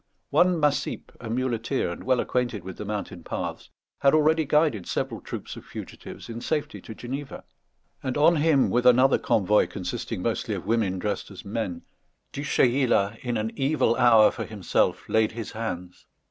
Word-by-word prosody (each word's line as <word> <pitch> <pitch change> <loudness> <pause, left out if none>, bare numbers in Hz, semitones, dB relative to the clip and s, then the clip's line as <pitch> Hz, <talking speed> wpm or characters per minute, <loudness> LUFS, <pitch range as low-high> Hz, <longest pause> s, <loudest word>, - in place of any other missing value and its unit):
One 180 -1 +4
Massip, 150 -1 -1
a 115 - -7
muleteer, 120 -3 -1
and 85 - -7
well 130 -1 +2
acquainted 120 -7 -1
with 95 -1 -8
the 105 - -6
mountain 100 -4 -5
paths, - - -5 0.3
had 140 +2 +4
already 155 +1 +3
guided 145 - +2
several - - -2
troops - - -7
of - - -10
fugitives - - -9
in 115 0 -6
safety 150 +3 -2
to 110 - -9
Geneva; 135 +4 -6 0.6
and 130 0 -2
on 155 +3 +5
him, 150 -3 +3
with 125 +1 +3
another 130 +2 +5
convoy, 105 +1 +3
consisting 90 -3 -5
mostly - - -1
of - - -6
women 110 -5 +1
dressed 105 +3 -3
as 100 -1 -11
men, 100 -5 -3 0.5
Du 140 - -4
Chayla, 120 -6 +2
in 120 -2 -2
an 110 +1 -2
evil 140 -3 +2
hour 115 -3 +6
for - - -5
himself, 105 -5 0
laid 110 0 +2
his 115 -2 -6
hands. 90 -6 -6
120 Hz, 170 wpm, -26 LUFS, 105-140 Hz, 0.6 s, hour